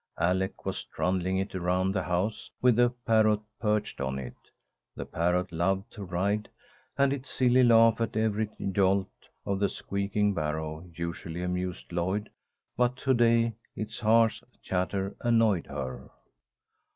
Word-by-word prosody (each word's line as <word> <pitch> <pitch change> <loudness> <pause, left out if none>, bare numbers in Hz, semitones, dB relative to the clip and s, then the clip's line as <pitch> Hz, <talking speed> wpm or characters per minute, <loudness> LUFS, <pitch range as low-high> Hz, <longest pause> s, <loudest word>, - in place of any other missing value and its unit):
Alec 95 +3 0
was - - -3
trundling 95 0 -1
it 95 +1 -2
around 90 +1 +1
the 95 -1 0
house, 90 +4 -2
with 125 -2 +4
the 120 +1 +5 0.2
parrot 110 -2 +4 0.2
perched 105 - -1
on 65 0 -2
it. 65 -3 -6 0.6
The - - -5
parrot 90 +2 0
loved 95 +4 0
to 105 - -7
ride, 100 +4 -1 0.5
and 140 0 +3
its 135 -1 -6
silly 125 0 +3
laugh 115 -1 +6
at 115 -1 -1
every 110 -1 +1 0.2
jolt 95 0 +2 0.3
of 100 -1 -1
the 100 - +2
squeaking 100 +1 -1
barrow 80 +1 -3
usually 85 +1 -4
amused 90 0 -3
Lloyd, 95 +5 -1 0.4
but 125 0 +2
to 135 0 +1
day 115 -1 +3 0.2
its 110 0 -5
harsh 115 0 +3 0.2
chatter 95 +1 -1
annoyed 115 -6 +3
her. 65 -1 -6
100 Hz, 140 wpm, -28 LUFS, 90-110 Hz, 0.6 s, laugh